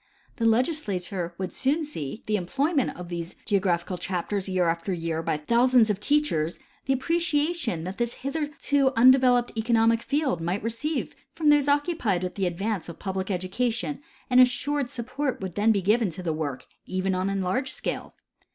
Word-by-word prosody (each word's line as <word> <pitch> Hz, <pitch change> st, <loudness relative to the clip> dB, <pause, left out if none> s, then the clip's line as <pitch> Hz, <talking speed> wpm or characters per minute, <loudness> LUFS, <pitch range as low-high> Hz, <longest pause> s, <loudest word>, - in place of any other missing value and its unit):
The 230 Hz, -, 0 dB
legislature 200 Hz, -, 0 dB
would 190 Hz, -1 st, -4 dB
soon 300 Hz, +4 st, +1 dB
see, 150 Hz, -, -5 dB
from 220 Hz, -, -18 dB
the 215 Hz, -, 0 dB
employment 275 Hz, -, 0 dB
of 175 Hz, -1 st, -8 dB
these 170 Hz, 0 st, -5 dB
geographical 185 Hz, -3 st, 0 dB
chapters 190 Hz, +2 st, -2 dB
year 185 Hz, -2 st, +1 dB
after 165 Hz, +3 st, -1 dB
year 165 Hz, -2 st, -2 dB
by 155 Hz, -, -1 dB
thousands 235 Hz, +7 st, +4 dB
of 200 Hz, -, -3 dB
teachers, 210 Hz, -, +1 dB, 0.3 s
the 270 Hz, -, +2 dB
appreciation 295 Hz, -, 0 dB
that 185 Hz, +5 st, -6 dB
tliis 240 Hz, 0 st, -1 dB
hitherto 285 Hz, -1 st, 0 dB
undeveloped 250 Hz, 0 st, +5 dB
economic 230 Hz, 0 st, +3 dB
field 275 Hz, -, 0 dB
might 175 Hz, +5 st, -2 dB
receive 230 Hz, +8 st, -2 dB, 0.2 s
from 310 Hz, -2 st, +2 dB
those 295 Hz, -1 st, +5 dB
occupied 285 Hz, -, +1 dB
with 180 Hz, -, -3 dB
the 195 Hz, -2 st, -1 dB
advance 195 Hz, +1 st, -2 dB
of 170 Hz, -, -8 dB
public 190 Hz, 0 st, -3 dB
education, 230 Hz, +9 st, -1 dB, 0.3 s
and 250 Hz, 0 st, +6 dB
as 255 Hz, -, +7 dB
sured 285 Hz, +1 st, -1 dB
support 260 Hz, +2 st, -3 dB
would 190 Hz, -2 st, -5 dB
then 210 Hz, +5 st, +3 dB
be 200 Hz, -3 st, +1 dB
given 215 Hz, +2 st, +3 dB
to 175 Hz, +2 st, -7 dB
the 165 Hz, -2 st, -1 dB
work, 145 Hz, -4 st, -4 dB, 0.2 s
even 185 Hz, +1 st, -1 dB
on 185 Hz, +1 st, 0 dB
enlarged 195 Hz, +7 st, -1 dB
scale. -, -, -4 dB
220 Hz, 170 wpm, -26 LUFS, 180-265 Hz, 0.3 s, as